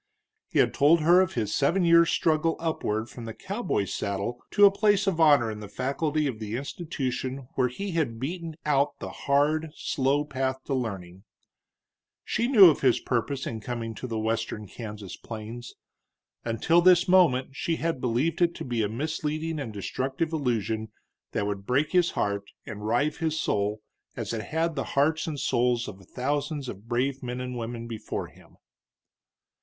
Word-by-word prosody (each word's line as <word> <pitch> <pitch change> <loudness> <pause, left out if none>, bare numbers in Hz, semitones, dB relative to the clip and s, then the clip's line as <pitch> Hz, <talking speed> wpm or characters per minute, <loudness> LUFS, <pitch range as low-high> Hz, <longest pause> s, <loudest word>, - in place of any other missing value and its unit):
He - - -2
had - - +4
told 155 +4 +5
her 175 +4 +6
of 185 - 0
his 110 -3 -1
seven 175 +6 +2
years' 170 0 +6
struggle 160 0 +2
upward 115 -9 -1
from 120 0 -9
the 115 - -7
cowboy's 190 - -2
saddle 100 +4 -3
to 205 -1 +6
a 200 - +8
place 205 -1 +2
of 190 -4 0
honor 145 -8 +5
in 105 - -7
the 105 - -8
faculty 150 +5 -1
of 125 -6 -3
the 110 0 -4
institution 135 -3 -4
where 130 -1 +2
he 195 +11 -5
had 140 -9 -1
beaten 165 +4 -4
out 145 -1 +2
the - - -6
hard, 150 +3 +1
slow 140 +1 0
path 130 -2 -2
to 140 - -3
learning; 95 -7 -4 1.0
she 235 +2 0
knew 215 -8 +9
of 155 - +3
his 130 -3 +4
purpose 130 +2 -2
in 110 - -4
coming 115 0 -4
to 125 - -6
the 115 -2 -3
western 110 -1 -2
Kansas 105 -3 -8
plains. 115 +2 -8 0.7
Until 120 +9 +2
this 180 +1 +5
moment 150 -8 +4
she 165 +3 -1
had 165 -5 -2
believed 130 +9 0
it 170 -1 +3
to - - -6
be 120 -3 -1
a 105 - 0
misleading 155 +5 -2
and 130 -6 -4
destructive 135 - -3
illusion 110 -6 -1 0.4
that 100 - 0
would 100 -1 -4
break 140 +5 +1
his 180 -2 +4
heart 100 0 -1 0.2
and 105 -1 -6
rive 140 +7 +1
his 160 -2 -1
soul, 105 +1 0 0.3
as - - -4
it 110 -2 -3
had 165 +1 -1
the 135 - -2
hearts 155 +3 +2
and 150 -3 -3
souls 120 -2 +1
of 95 0 -9
thousands 145 +2 -2
of 105 0 -8
brave 130 +3 0
men 125 0 -4
and 125 0 -4
women 115 0 -5
before 110 -2 -5
him. - - -20
130 Hz, 175 wpm, -27 LUFS, 115-160 Hz, 1.0 s, knew